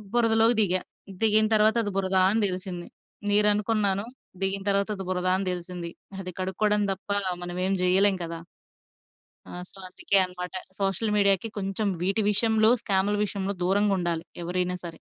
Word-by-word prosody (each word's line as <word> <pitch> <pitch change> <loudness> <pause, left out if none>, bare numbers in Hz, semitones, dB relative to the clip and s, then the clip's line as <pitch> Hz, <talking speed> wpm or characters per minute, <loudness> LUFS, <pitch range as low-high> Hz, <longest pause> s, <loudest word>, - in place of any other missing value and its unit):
బురదలోకి 225 0 +4
దిగా, 185 -2 +2 0.4
దిగిన 215 0 +4
తర్వాత 215 +1 +4
అది 205 - -3
బురదా 190 -1 +2
అని 220 +1 +1
దెలిసింది. 185 -1 -5 0.4
నీరు 210 0 +5
అనుకున్నాను 205 -1 0 0.4
దిగిన 195 0 0
తర్వాత 200 +1 +1
అది 190 - -6
బురదా 185 0 0
అని 190 -1 -3
దెలిసింది, 175 -1 -6 0.3
అది 185 0 -6
కడుక్కోవడం 210 +3 0
దప్ప 195 +1 -7 0.3
మనమేం 180 +2 -2
జేయలేం 190 +2 +4
కదా! 165 0 -7 1.1
ఆ! - - -10 0.2
సో, 195 - -11
అందుకే 195 +2 +2
అన్నమాట. 180 0 -8 0.3
సోషల్ 195 +2 0
మీడియా‌కి 200 +1 +3
కొంచెం 195 +2 -2
వీటి 195 +4 +1
విషయంలో 220 +1 +3
స్కామ్‌ల 200 0 +1
విషయంలో 200 0 -3
దూరంగా 200 +2 +2
ఉండాలి. 170 -2 -2 0.2
ఎవరైనా 180 +1 -1
సరే. 165 -1 -8
195 Hz, 145 wpm, -25 LUFS, 180-210 Hz, 1.1 s, నీరు